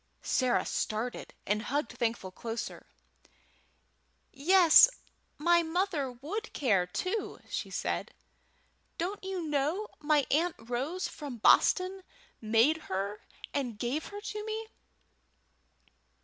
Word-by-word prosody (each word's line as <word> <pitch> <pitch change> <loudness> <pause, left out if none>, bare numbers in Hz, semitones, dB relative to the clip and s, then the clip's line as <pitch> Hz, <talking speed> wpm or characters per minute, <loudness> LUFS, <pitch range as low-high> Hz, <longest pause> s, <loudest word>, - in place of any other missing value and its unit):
Sarah 255 -2 +1
started, 220 +3 -3
and 210 +1 0
hugged 285 +6 -2
Thankful 225 -5 -2
closer. 230 +4 -6 1.5
"Yes, 340 - +7 0.5
my 345 +3 +4
mother 325 -5 -1
would 330 - -5
care, 200 -10 +2
too," 370 - -3
said - - -3
she. - - -26 0.8
"Don't 380 +5 -3
you 380 -2 -3
know 305 +7 -1
my 300 -2 +2
Aunt 330 +4 +2
Rose 260 +11 -3
from 285 -5 -7
Boston 370 - +4 0.4
made 230 +8 +4
her 200 +2 -3 0.3
and 250 -6 -2
gave 245 +7 -2
her 410 0 -8
to 425 0 -5
me?" 440 +1 -4
295 Hz, 105 wpm, -30 LUFS, 240-370 Hz, 1.5 s, Yes